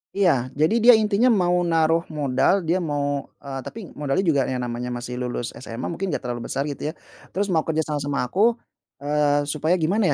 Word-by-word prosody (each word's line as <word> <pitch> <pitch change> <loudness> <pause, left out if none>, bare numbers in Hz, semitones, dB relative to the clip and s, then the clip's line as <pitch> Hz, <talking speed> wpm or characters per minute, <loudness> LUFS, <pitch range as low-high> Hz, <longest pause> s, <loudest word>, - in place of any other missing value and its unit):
Iya. 195 -3 +4 0.3
Jadi 155 +9 +3
dia 245 +1 +9
intinya 210 +3 +2
mau 175 0 +2 0.2
naruh 165 0 +3 0.2
modal, 145 +8 +2
dia 175 +3 +2
mau, 145 -4 -2 0.2
eee, 135 -1 -5
tapi 225 - -7 0.2
modalnya 150 +6 0
juga 155 -7 +3
yang 125 -1 -2
namanya 120 0 -4
masih 125 0 -6
lulus 120 -1 -3
SMA 115 +1 -5
mungkin 185 +3 -3
nggak 175 - -3
terlalu 120 -1 -4
besar, 135 - -1
gitu, 140 - -8
ya, - - -6 0.4
terus 200 +2 0
mau 160 -3 +2
kerja 160 0 +1
sama 150 -1 -3
sama 145 0 -2
aku, 205 - +2 0.5
eee, 145 0 +2
supaya 155 +4 0
gimana, 185 +5 +1
150 Hz, 195 wpm, -23 LUFS, 135-180 Hz, 0.5 s, dia